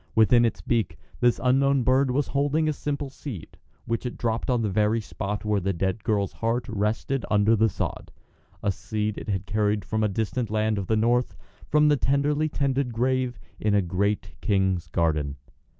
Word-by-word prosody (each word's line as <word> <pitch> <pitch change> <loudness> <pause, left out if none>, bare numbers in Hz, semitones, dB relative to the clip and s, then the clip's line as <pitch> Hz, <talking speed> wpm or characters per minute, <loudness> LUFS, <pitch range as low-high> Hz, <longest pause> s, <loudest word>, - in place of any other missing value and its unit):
Within 120 +2 +5
its 115 - -2
beak 115 -6 -1 0.2
this 120 0 +3
unknown 135 +1 +3
bird 130 +2 +3
was 135 +3 0
holding 145 +3 +1
a 155 - +1
simple 145 -1 -4
seed, 130 - -8 0.3
which 115 +1 -2
it 125 - -5
dropped 115 +1 -1
on 120 -2 +2
the - - +1
very 105 +3 +2
spot 105 -1 -4
where 105 -1 +2
the 95 +1 -1
dead 95 +4 -2
girl's 100 -3 0
heart 115 +2 -1
rested 110 +4 -1
under 105 +2 +4
the 110 +1 +3
sod - - -4 0.5
a 100 - +2
seed 105 +1 -3
it - - -8
had 95 -2 -1
carried 105 0 0
from 110 0 -1
a - - +3
distant 110 +3 -2
land 110 0 0
of 95 - -4
the 110 - +2
north 120 +3 +1 0.3
from 150 0 +4
the 145 -1 +4
tenderly 145 +3 +1
tended 135 -3 0
grave 125 +1 0 0.2
in 105 -1 +1
a 100 - +4
great 100 +4 -1
king's 95 -5 +1
garden. 75 -3 0
110 Hz, 185 wpm, -25 LUFS, 105-130 Hz, 0.5 s, Within